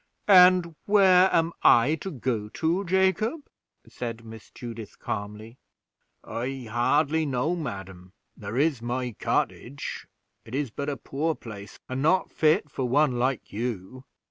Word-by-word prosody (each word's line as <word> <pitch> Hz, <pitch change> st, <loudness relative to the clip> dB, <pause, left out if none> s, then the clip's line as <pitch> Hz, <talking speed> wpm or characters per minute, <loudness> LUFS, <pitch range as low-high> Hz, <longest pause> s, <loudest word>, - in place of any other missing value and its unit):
"And 180 Hz, -3 st, +6 dB
where 190 Hz, -2 st, +6 dB
am 165 Hz, 0 st, +2 dB
I 120 Hz, +6 st, +5 dB
to 195 Hz, -, -4 dB
go 120 Hz, -, -3 dB
to, 165 Hz, -, -1 dB
Jacob?" 190 Hz, -, +1 dB, 0.5 s
said 115 Hz, -1 st, -6 dB
Miss 110 Hz, -1 st, -11 dB
Judith, 115 Hz, -3 st, -9 dB
calmly. 105 Hz, +4 st, -6 dB, 0.6 s
"I 125 Hz, +1 st, -5 dB
hardly 145 Hz, +7 st, +2 dB
know, 140 Hz, +6 st, 0 dB
madam; 95 Hz, -, -7 dB, 0.2 s
there 105 Hz, +3 st, -6 dB
is 145 Hz, -3 st, +1 dB
my 120 Hz, -1 st, -3 dB
cottage; 140 Hz, +4 st, -3 dB, 0.4 s
it 115 Hz, +3 st, -8 dB
is 140 Hz, -4 st, -2 dB
but 140 Hz, +5 st, -4 dB
a 140 Hz, -, -3 dB
poor 150 Hz, +6 st, -2 dB
place, 105 Hz, -5 st, -10 dB
and 130 Hz, +1 st, -3 dB
not 180 Hz, +5 st, +2 dB
fit 155 Hz, +3 st, +2 dB
for 130 Hz, -3 st, -3 dB
one 135 Hz, -2 st, +2 dB
like 130 Hz, 0 st, -1 dB
you." 115 Hz, +2 st, -5 dB
130 Hz, 140 wpm, -26 LUFS, 115-160 Hz, 0.6 s, And